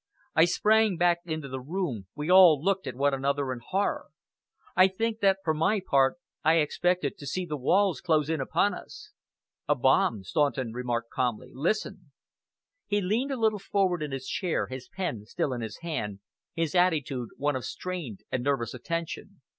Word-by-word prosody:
I 160 - +6
sprang 210 +2 +3
back 175 0 +3
into 155 -4 -4
the 130 0 -5
room, 135 - -3
we 150 +3 -2
all 180 -5 +8
looked 190 +4 0
at - - -4
one 140 +2 +2
another 135 0 0
in 125 - -7
horror. 195 +7 -1 0.7
I 185 0 +7
think 225 +4 -2
that 195 -2 +4
for 160 - +1
my 165 +7 +2
part 135 - +2 0.3
I 160 +1 +5
expected 165 0 0
to 145 - -8
see 180 +7 -2
the 155 -3 -4
walls 185 +7 +2
close 155 -4 +2
in 160 -2 -1
upon 200 +9 +1
us. - - -10 0.6
"A - - +3
bomb," 105 -4 +2
Staunton 135 - 0
remarked 120 -1 -3
calmly. 125 -4 -2
"Listen!" 165 - -2 0.8
He 205 0 +1
leaned 220 +9 0
a 270 - -2
little 220 -2 +2
forward 190 -3 0
in 150 -2 -3
his 135 -1 -5
chair, 180 -4 -1
his 130 0 -8
pen 175 - -4
still 130 +4 -2
in 120 - -4
his 110 -2 -6
hand, 105 -13 -4 0.3
his 165 -2 -1
attitude 150 -9 +1
one 145 0 0
of 130 - -3
strained 160 - -5
and 125 - -1
nervous 135 -5 0
attention. 165 +7 -5
155 Hz, 180 wpm, -28 LUFS, 130-185 Hz, 0.8 s, all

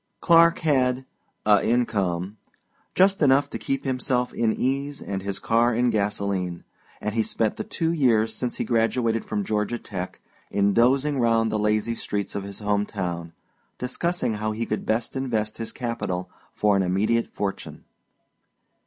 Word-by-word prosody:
Clark 170 0 +6
had 130 -4 +2 0.4
"a 105 -2 +5
income" 100 -5 0 0.6
just 195 0 +4
enough 140 0 +4
to - - -4
keep 135 0 -2
himself 125 -1 0
in 115 -2 +1
ease 140 +4 -1
and 95 -1 -4
his 100 0 -3
car 115 +1 +2
in 120 +1 +2
gasolene 100 -4 -1 0.4
and 105 0 -3
he 115 - -1
had - - -2
spent 110 -2 0
the - - -3
two 165 0 -1
years 115 -8 +3
since 125 -1 -3
he - - -2
graduated 115 0 +1
from 105 - -2
Georgia 105 +3 -1
Tech 95 -5 -6 0.3
in 100 0 +2
dozing 135 +5 +3
round 115 -2 +2
the 110 - 0
lazy 105 +2 +1
streets 105 -3 -3
of 100 - -3
his 100 -1 -7
home 105 -1 0
town, 85 -4 -4 0.4
discussing 170 +2 -1
how 110 0 -2
he 115 +2 -2
could 110 - -3
best 115 +3 -1
invest 110 -5 -1
his 115 - -4
capital 95 -7 -3 0.2
for 105 -1 +3
an 100 - +3
immediate 100 +6 +1
fortune. 100 -1 -4
115 Hz, 160 wpm, -25 LUFS, 100-125 Hz, 0.6 s, Clark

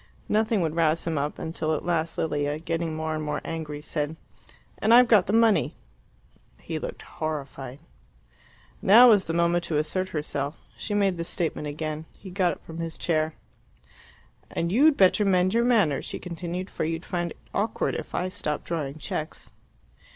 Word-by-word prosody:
Nothing 215 -1 +2
would 160 -1 -1
rouse 165 -1 +2
him 160 -3 0
up, 145 +1 -2
until 160 -1 -2
at - - -5
last 165 -2 0
Lilia, 145 -2 0
getting 165 0 -2
more 160 0 -2
and 155 0 -3
more 150 0 -2
angry, 150 -2 -5
said, 150 0 -2 0.6
"And 225 +2 +5
I've 250 0 +8
got 210 -5 +5
the - - 0
money." 225 -1 +3 0.8
He - - -4
looked - - -6
horrified. 140 -4 -5 1.0
Now 235 +6 +8
was 205 -4 +5
the 165 - -3
moment 170 +1 +2
to 155 - -1
assert 185 +5 0
herself. 150 -1 -3 0.2
She 205 - -3
made 195 -3 +2
the 170 - -2
statement 165 -3 -2
again. 155 +1 -4
He 190 - -11
got 180 -1 +2
up - - -14
from 165 0 -8
his 165 -1 -4
chair. 155 -2 0 1.1
"And 170 +1 -2
you'd 280 +7 +5
better 190 +2 +5
mend 185 -1 +3
your 235 +1 +3
manners," 205 - +3
she - - -4
continued, 175 +2 -5
"for - - -3
you'd 165 +2 -2
find 175 -2 -2
it - - -11 0.2
awkward 215 +2 0
if - - -5
I 180 - 0
stopped 150 -4 -2
drawing 150 -4 -3
cheques." 155 0 -5
165 Hz, 175 wpm, -26 LUFS, 155-190 Hz, 1.1 s, I've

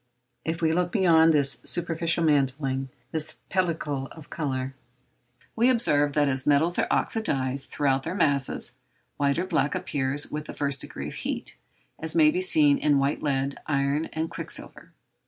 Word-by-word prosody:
If 165 +1 -3
we 160 - +3
look 175 +1 0
beyond 165 -5 +5
this 140 -3 +3
superficial 170 -1 0
mantling, 135 -2 0 0.2
this 155 -1 +2
pellicle 155 -7 -1
of 160 -3 -14
colour, 135 -3 -3 0.8
we 235 +3 +3
observe 145 - +2
that 145 0 +2
as 130 0 +1
metals 155 +4 +3
are - - +1
oxydized 135 - 0
throughout 135 -2 0
their 165 +6 -5
masses, 140 -7 +1 0.4
white 140 0 +1
or 175 - -1
black 160 -6 0
appears 140 0 -2
with 150 0 -4
the - - -9
first 140 -2 0
degree - - -5
of - - -9
heat, - - -4 0.4
as 160 - -4
may 305 -1 +6
be 360 +3 -1
seen 300 -6 +4
in 145 -2 +3
white 140 +1 0
lead, 140 -1 -1
iron, 140 +1 0
and 160 +1 -3
quicksilver. - - -7
150 Hz, 160 wpm, -26 LUFS, 140-170 Hz, 0.8 s, may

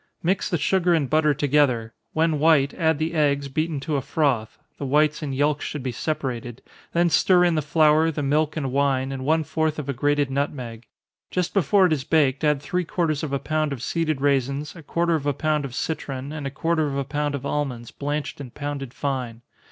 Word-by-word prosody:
Mix 185 +3 +1
the 175 - +1
sugar 175 +2 +2
and 150 -4 +1
butter 155 0 +3
together 140 -6 +2 0.2
when 160 -1 +1
white, 150 -3 +4
add 160 -3 +1
the 160 +2 -2
eggs, 140 -3 +1
beaten 155 +2 -1
to 150 +1 -1
a - - -1
froth, 130 -7 0 0.2
(the 140 - -3
whites 150 +3 +2
and 140 -3 -3
yelks 145 +1 +1
should 150 -4 -4
be 130 - -2
separated) 120 -3 -4 0.3
then 170 0 +2
stir 180 +1 +5
in 175 -1 +3
the 155 - +1
flour, 155 +1 +4
the 150 -2 -3
milk 150 +3 +1
and 135 -4 -2
wine, 135 -1 +1
and 135 -1 -5
one 160 +3 +2
fourth 160 0 -1
of 150 -3 -5
a 140 - -1
grated 145 +1 +1
nutmeg. 125 -5 -3 0.4
Just 180 -1 -1
before 195 +1 +4
it 170 - +3
is 140 -4 -2
baked, 140 -2 +2
add 150 -2 +2
three 180 +3 -1
quarters 160 -3 -1
of 155 -4 -4
a 140 - +1
pound 155 +1 -1
of 130 -3 -5
seeded 155 -4 -1
raisins, 140 +2 0
a 165 - -10
quarter 170 +2 0
of 150 -3 -1
a 145 - +2
pound 150 +1 0
of 125 -3 -7
citron, 140 -3 -4
and 150 -3 -4
a - - -2
quarter 160 +3 0
of 140 -1 -3
a 140 - 0
pound 145 +1 -2
of 140 -1 -6
almonds, 130 -6 -3
blanched 145 0 -4
and 125 -4 -10
pounded 140 -3 -5
fine. 125 -5 -3
145 Hz, 215 wpm, -24 LUFS, 135-155 Hz, 0.4 s, stir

